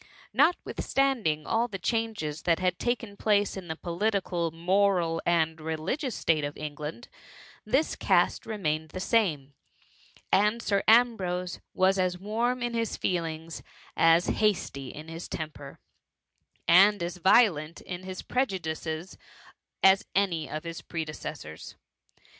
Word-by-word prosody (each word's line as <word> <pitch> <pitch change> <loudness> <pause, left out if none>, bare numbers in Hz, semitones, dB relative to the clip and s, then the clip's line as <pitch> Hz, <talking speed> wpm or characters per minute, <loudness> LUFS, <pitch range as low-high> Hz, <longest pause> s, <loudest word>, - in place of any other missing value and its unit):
Notwithstanding 260 - +1
all 230 +2 +1
the 205 -5 -6
changes 200 -7 -2
that 170 -2 +2
had 180 -1 0
taken 235 -4 -2
place 205 -1 +1
in 190 -2 -7
the 160 - -4
political, 175 -1 -1
moral, 175 0 +1
and 160 -2 +1
religious 160 - -3
state 155 -2 +1
of 145 0 -4
England, 150 +8 -6 0.6
this 265 +9 +1
caste - - +2
remained 160 -7 -2
the 185 - -6
same; 160 -11 +1 0.8
and 210 +4 +3
Sir 200 -4 +1
Ambrose 190 -7 +3 0.2
was 190 +1 +3
as 180 -1 +1
warm 235 +6 -1
in 240 0 -2
liis 230 -2 -1
feelings; 165 -2 -3 0.3
as 165 +1 +5
hasty 180 -10 0
in 155 +4 -9
his 165 +1 -7
temper, 150 -3 -7 0.9
and 195 +3 +6
as 175 +1 -4
violent 170 -5 +3
in 180 -1 -6
his 185 0 -7
prejudices 170 -8 -3 0.6
as 190 0 +5
any 180 -6 +1
of 155 0 -5
his 165 -1 -6
predecessors. 155 - -7
180 Hz, 125 wpm, -28 LUFS, 160-210 Hz, 0.9 s, and